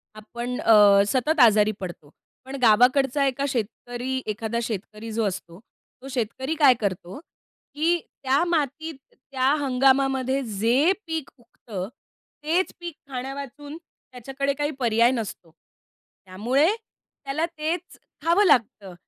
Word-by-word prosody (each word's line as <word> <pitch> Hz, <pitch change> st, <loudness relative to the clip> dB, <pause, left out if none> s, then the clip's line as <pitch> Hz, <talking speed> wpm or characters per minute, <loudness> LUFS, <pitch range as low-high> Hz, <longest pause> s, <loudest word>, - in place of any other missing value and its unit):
आपण 235 Hz, +3 st, -6 dB
अ, 225 Hz, -, +5 dB, 0.3 s
सतत 275 Hz, +7 st, 0 dB
आजारी 215 Hz, -3 st, +6 dB
पडतो. 175 Hz, -6 st, -8 dB, 0.4 s
पण 265 Hz, +1 st, -7 dB
गावाकडचा 255 Hz, +5 st, +4 dB
एका 270 Hz, +1 st, -1 dB
शेतकरी 245 Hz, +2 st, -3 dB
एखादा 220 Hz, +2 st, -3 dB
शेतकरी 215 Hz, 0 st, -6 dB
जो 225 Hz, 0 st, 0 dB
असतो, 175 Hz, -2 st, -6 dB, 0.4 s
तो 265 Hz, -, -10 dB
शेतकरी 260 Hz, +4 st, -3 dB
काय 280 Hz, -4 st, +7 dB
करतो? 185 Hz, +1 st, -3 dB, 0.6 s
की 335 Hz, +3 st, +2 dB, 0.2 s
त्या 270 Hz, +4 st, +2 dB
मातीत, 315 Hz, -1 st, -2 dB, 0.2 s
त्या 260 Hz, 0 st, -2 dB
हंगामामध्ये 265 Hz, 0 st, +2 dB
जे 235 Hz, -, +2 dB, 0.2 s
पीक 320 Hz, -3 st, -4 dB
उगतं, 220 Hz, -5 st, -8 dB, 0.6 s
तेच 345 Hz, +5 st, 0 dB
पीक 345 Hz, -2 st, -6 dB, 0.2 s
खाण्यावाचून 275 Hz, +3 st, -7 dB
त्याच्याकडे 275 Hz, -3 st, -5 dB
काही 290 Hz, +2 st, -2 dB
पर्याय 235 Hz, 0 st, +3 dB
नसतो. 215 Hz, -8 st, -5 dB, 0.7 s
त्यामुळे 235 Hz, -, +1 dB
त्याला 310 Hz, -8 st, -6 dB
तेच 330 Hz, +3 st, -3 dB, 0.3 s
खावं 350 Hz, +5 st, +4 dB
लागतं 210 Hz, -, +1 dB
260 Hz, 115 wpm, -24 LUFS, 225-285 Hz, 0.7 s, काय